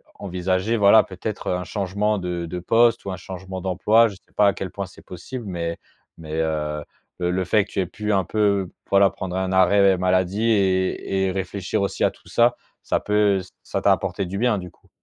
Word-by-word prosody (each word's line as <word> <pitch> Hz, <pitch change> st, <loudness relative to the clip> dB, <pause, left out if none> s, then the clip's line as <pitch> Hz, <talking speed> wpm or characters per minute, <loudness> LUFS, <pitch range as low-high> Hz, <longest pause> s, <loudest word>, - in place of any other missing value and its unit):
envisager 95 Hz, +3 st, -1 dB
voilà 105 Hz, +1 st, +6 dB
peut-être, 100 Hz, +1 st, -6 dB
heu, -, -, +1 dB
un 90 Hz, -, -3 dB
changement 100 Hz, +3 st, -1 dB
de 90 Hz, -2 st, -3 dB
de 90 Hz, +2 st, -5 dB
poste 115 Hz, +5 st, +3 dB
ou 100 Hz, -, -3 dB
un -, -, -3 dB
changement 95 Hz, +1 st, -7 dB
d'emploi. 100 Hz, +5 st, +3 dB
Je 100 Hz, -, -10 dB
sais 90 Hz, -, -24 dB
pas 105 Hz, -, +5 dB
à 100 Hz, -, +3 dB
quel 95 Hz, -2 st, -6 dB
point 100 Hz, -, -4 dB
c'est 95 Hz, -, -17 dB
possible, 110 Hz, +7 st, -8 dB
mais 85 Hz, -2 st, -3 dB, 0.4 s
mais 80 Hz, -2 st, -9 dB
heu, 75 Hz, -1 st, -2 dB, 0.4 s
le 90 Hz, -1 st, 0 dB
le 95 Hz, +1 st, -1 dB
fait 105 Hz, +3 st, +3 dB
que -, -, -19 dB
tu -, -, -3 dB
aies -, -, -1 dB
pu 105 Hz, +4 st, -4 dB
un 95 Hz, -1 st, +2 dB
peu 100 Hz, -2 st, +1 dB
p -, -, -30 dB, 0.2 s
voilà 100 Hz, 0 st, +5 dB
prendre 90 Hz, -1 st, -5 dB
un 95 Hz, 0 st, -1 dB
arrêt 95 Hz, +1 st, +5 dB
maladie 95 Hz, +3 st, +1 dB
et 95 Hz, -1 st, +1 dB
et -, -, 0 dB
réfléchir 95 Hz, 0 st, -3 dB
aussi 100 Hz, -, -2 dB
à -, -, +5 dB
tout -, -, -22 dB
ça, 120 Hz, +1 st, +3 dB, 0.3 s
ça -, -, 0 dB
peut 105 Hz, -2 st, +2 dB
ç -, -, -14 dB
ça -, -, -3 dB
t'a -, -, +5 dB
apporté 100 Hz, -, -2 dB
du 95 Hz, +2 st, -5 dB
bien 120 Hz, -2 st, +2 dB
du 90 Hz, -2 st, -7 dB
coup. -, -, -30 dB
95 Hz, 225 wpm, -23 LUFS, 90-105 Hz, 0.4 s, voilà